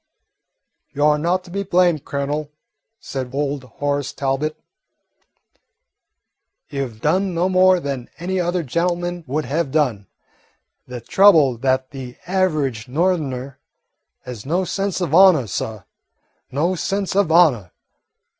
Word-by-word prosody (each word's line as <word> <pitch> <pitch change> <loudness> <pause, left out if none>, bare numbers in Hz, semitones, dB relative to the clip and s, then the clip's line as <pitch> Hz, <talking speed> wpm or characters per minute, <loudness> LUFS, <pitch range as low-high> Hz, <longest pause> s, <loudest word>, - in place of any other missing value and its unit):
"You 145 +1 +1
're 150 0 +4
not 180 +4 0
to 180 - -14
be 200 +2 -2
blamed, 180 -5 +2
Colonel," 145 +1 -3 0.5
said 130 -2 -5
old 140 -1 -2
Horace 145 +2 -3
Talbot. 140 +3 -2 2.1
"You 140 -2 -2
've 110 -2 -15
done 185 +4 +1
no 175 +2 +1
more 185 0 +4
than 135 -6 -5
any 185 +2 -2
other 175 0 0
gentleman 175 +4 -2
would 150 +4 -2
have 155 +1 -1
done. 125 -10 0 0.8
The 125 -1 -7
trouble 160 - +5
is 115 - -14
that 130 0 0
the 130 -3 -8
average 155 -10 0
Northerner 140 -4 -1 0.6
has 125 -5 -8
no 175 +6 0
sense 195 +1 -2
of 165 -4 -2
honour, 180 -7 +6
suh, 110 0 -4 0.7
no 160 +7 0
sense 195 +2 -2
of 195 -5 +2
honour. 145 - +4
150 Hz, 130 wpm, -20 LUFS, 135-180 Hz, 2.1 s, honour